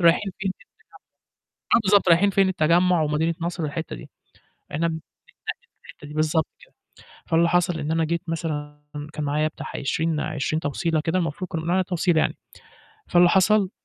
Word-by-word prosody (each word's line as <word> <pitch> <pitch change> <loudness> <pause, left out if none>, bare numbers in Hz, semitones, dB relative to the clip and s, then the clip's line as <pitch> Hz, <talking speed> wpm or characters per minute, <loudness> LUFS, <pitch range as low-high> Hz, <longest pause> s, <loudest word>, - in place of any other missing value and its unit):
رايحين 175 +3 +3
فين؟ 195 0 -1 1.0
التجمّع - - +1
آه، - - +2
بالضبط، 195 -2 +4
رايحين 185 +4 +5
فين 195 -1 +3
التجمُّع 175 0 +3
ومدينة 155 +2 +1
نصر 170 0 -3
والحتّة 155 - -4
دي، - - -11 0.6
إحنا 165 +3 0
م - - -1
بنتنقل 160 0 -5 0.8
في - - -26
الحتّة 145 - -12
دي، 150 - -10
بالضبط 155 +1 +1
كده. - - -20 0.5
فاللي 170 +1 +3
حصل 175 -1 +1
إن 150 +1 -3
أنا 165 0 +2
جيت 170 +2 -1
مثلًا 150 -3 -4 0.3
كان 150 -1 -4
معايا 150 +2 +1
بتاع - - -8
20- 160 +2 -1
20 155 0 -2
توصيلة 160 +2 -1
كده 165 +4 0
المفروض 170 +1 -3
كنّا 165 - -3
بنقول 165 +2 -3
عليها 185 +1 +3
توصيلة 175 -2 +1
يعني، - - 0 0.7
فاللي 175 0 +6
حصل 190 +1 +3
165 Hz, 180 wpm, -24 LUFS, 155-180 Hz, 1.0 s, فاللي